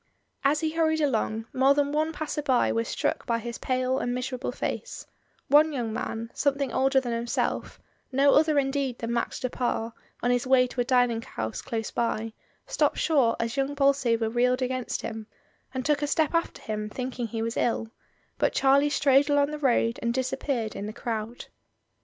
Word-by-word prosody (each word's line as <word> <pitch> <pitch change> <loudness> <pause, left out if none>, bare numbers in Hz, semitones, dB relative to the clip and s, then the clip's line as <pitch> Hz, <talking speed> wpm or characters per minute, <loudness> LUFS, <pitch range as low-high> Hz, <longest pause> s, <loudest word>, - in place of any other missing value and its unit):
As 285 +2 +2
he 315 -1 0
hurried 315 -1 +1
along 225 -6 0
more 270 +2 +4
than 285 0 +1
one 310 +2 0
passer 310 -2 -3
by 260 -4 +2
was 230 0 -1
struck - - -2
by 235 - +1
his 235 +1 -6
pale 255 0 0
and 245 0 -1
miserable 255 0 -3
face; 485 - -4 0.4
one 300 +3 +5
young 240 -6 -3
man, 230 +1 -4
something 280 -3 0
older 270 +1 +3
than 250 -2 -4
himself, 235 +1 -2 0.3
no 275 +2 +4
other 310 0 +4
indeed 270 -2 0
than 230 0 -3
Max 235 - -2
du 255 - -1
Pare, 235 -2 -2 0.3
on 245 - +3
his 245 +1 0
way 255 -1 +5
to 250 0 -3
a - - +2
dining 245 -2 +2
house 110 - -5
dose 225 -1 -4
by, 225 -1 -1 0.3
stopped - - +1
short 270 -8 +3
as 230 0 -2
young 275 +1 0
Bolsover 270 -5 +2
reeled 250 +3 +1
against 255 -1 -3
him, 220 -1 -5 0.4
and 260 -1 -4
took 295 -1 +2
a 290 - 0
step 310 +2 +1
after 335 0 -1
him 215 -1 -3
thinking 250 0 -4
he 225 0 -3
was 230 +1 -3
ill, 225 -1 0 0.5
but - - +2
Charlie 275 +2 +4
strode 280 0 +3
along 285 0 +3
the 300 - -5
road 240 -4 +2
and 235 0 -1
disappeared 260 -3 -2
in 205 - -4
the 215 - -6
crowd. 225 +1 -4
255 Hz, 190 wpm, -27 LUFS, 230-280 Hz, 0.5 s, one